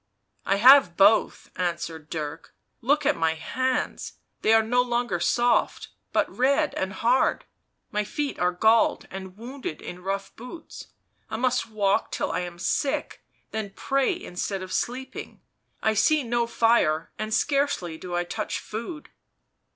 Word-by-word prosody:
" - - -51
I 195 - +3
have 240 -5 +7
both," 205 +3 +3
answered 165 -3 -3
Dirk. 155 0 -6
" - - -49
Look 295 0 +2
at 295 0 +3
my 160 0 +1
hands 255 +10 -2
— - - -50
they 220 - +3
are 225 0 +6
no 245 +3 +2
longer 240 -6 -1
soft, 240 +6 +1 0.2
but - - +2
red 280 +4 +2
and 190 0 -2
hard; 240 +6 +1 0.5
my 210 0 0
feet 285 +7 -3
are 180 0 +2
galled 220 +5 +3
and 190 0 -8
wounded 245 - -6
in 180 0 -8
rough 195 +1 -4
boots 250 +8 -10 0.2
— - - -44
I 220 - -3
must 250 -1 0
walk 205 -2 +1
till - - -2
I 165 - -1
am 175 -1 -6
sick, 270 +9 -2 0.3
then 215 -3 -4
pray 275 +7 0
instead 190 - -4
of 185 - -7
sleeping; 255 +2 -4 0.4
I 220 - +3
see 300 +7 +3
no 235 0 0
fire, 225 -9 +2
and 215 0 -3
scarcely 220 - 0
do 180 -1 -5
I 175 - +1
touch 215 +5 -4
food." 235 +9 -7
220 Hz, 160 wpm, -25 LUFS, 180-255 Hz, 0.5 s, have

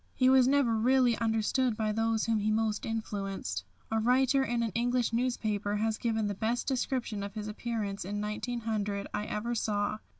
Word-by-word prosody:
He 255 0 +4
was 260 -1 +6
never 270 -4 +3
really 245 +1 +4
understood 225 +2 +1
by 215 -1 0
those 225 0 +1
whom 225 -2 +1
he 210 +1 0
most 215 -1 0
influenced. 195 - -3 0.3
A 225 - +2
writer 260 +4 +3
in 240 -2 0
an 225 - -1
English 240 +2 0
newspaper 215 -4 0
has 220 +1 0
given 220 -2 0
the 205 - -1
best 225 +4 -1
description 255 -5 -1
of 200 +1 -6
his 210 -1 -4
appearance 210 -2 -3
in 205 +3 -4
1900 210 -2 -2
I 210 - -2
ever 220 +3 -2
saw. 210 -2 -1
225 Hz, 175 wpm, -30 LUFS, 210-240 Hz, 0.3 s, was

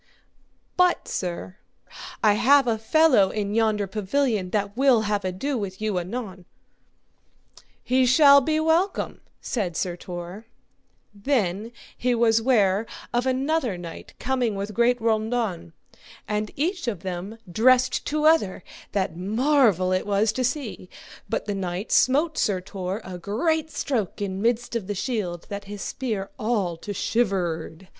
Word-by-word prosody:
But, 360 -1 +3
sir, 180 +1 -4 0.7
I 210 -2 +6
have 265 +5 +5
a 225 -2 0
fellow 265 -5 +4
in 205 -1 -3
yonder 215 -2 +2
pavilion 210 0 -1
that 200 +1 -2
will 260 -3 +4
have 205 -2 -1
ado 200 +9 -2
with 195 -2 -5
you 215 -4 -1
anon. 190 -1 -6 1.4
He 255 0 +2
shall 280 +2 +7
be 310 +4 0
welcome, 330 +5 0 0.2
said 185 -9 -2
Sir 180 -2 -1
Tor. 175 +5 -8 0.7
Then 210 -2 -1 0.3
was 235 -2 +3
he 225 - 0
ware 215 -4 +2 0.3
of 240 +2 +1
another 260 - 0
knight 170 -2 -9
coming 245 -4 -1
with 200 +2 -4
great 240 +3 +2
raundon, 220 -5 -1 0.6
and 210 0 -1
each 350 +2 -2
of 205 -8 -3
them 190 +4 -5
dressed 255 +5 +3
to 305 +1 0
other, 310 - +3 0.3
that 190 -4 -1
marvel 215 - +2
it 185 +2 0
was 205 +1 +2
to 255 - -2
see; 250 -8 -3 0.4
but 225 - -2
the 205 - -2
knight 190 +1 -4
smote 300 +5 +3
Sir 195 -3 +1
Tor 185 +2 -5
a 180 -1 -7
great 315 - 0
stroke 235 - -2
in 195 -1 -3
midst 235 +1 0
of 215 -5 -2
the 205 - -3
shield 185 -6 -3
that 200 0 -6
his 205 0 -7
spear 215 -7 -4
all 210 -6 0
to 205 - -7
shivered. 185 -5 -1
215 Hz, 145 wpm, -24 LUFS, 190-255 Hz, 1.4 s, shall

